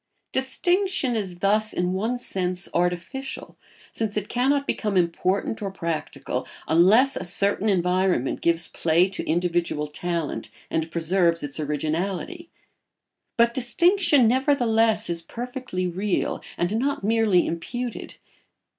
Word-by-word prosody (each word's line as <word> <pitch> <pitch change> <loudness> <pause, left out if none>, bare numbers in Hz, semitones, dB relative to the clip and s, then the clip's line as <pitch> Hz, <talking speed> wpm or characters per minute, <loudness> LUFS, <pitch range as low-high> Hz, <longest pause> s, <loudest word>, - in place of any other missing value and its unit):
] - - -38
Distinction 350 0 0
is 190 -5 -3
thus 215 +2 +2
in 180 +1 -1
one 225 +6 -1
sense 185 -6 -2
artificial, 180 +10 -3 0.4
since 215 -2 -2
it 210 -1 -3
cannot 275 +3 +1
become 210 -7 -1
important 185 +5 0
or 200 - -2
practical 170 -4 -4 0.2
unless 210 - +5
a - - -3
certain 200 +3 +1
environment 180 -6 +1
gives 170 0 +2
play 170 +3 +2
to 195 - -5
individual 170 -2 0
talent 165 +1 -3 0.2
and 160 0 -1
preserves 170 0 +1
its 145 +1 -2
originality; 175 - -3 0.9
but 235 0 +4
distinction 305 - +4
nevertheless 230 -4 +2
is 170 -1 -1
perfectly 240 -1 -5
real, 185 +3 -1 0.2
and 175 +5 0
not 280 -1 -1
merely 215 -4 +3
imputed. 240 +8 -5
195 Hz, 120 wpm, -24 LUFS, 175-245 Hz, 0.9 s, unless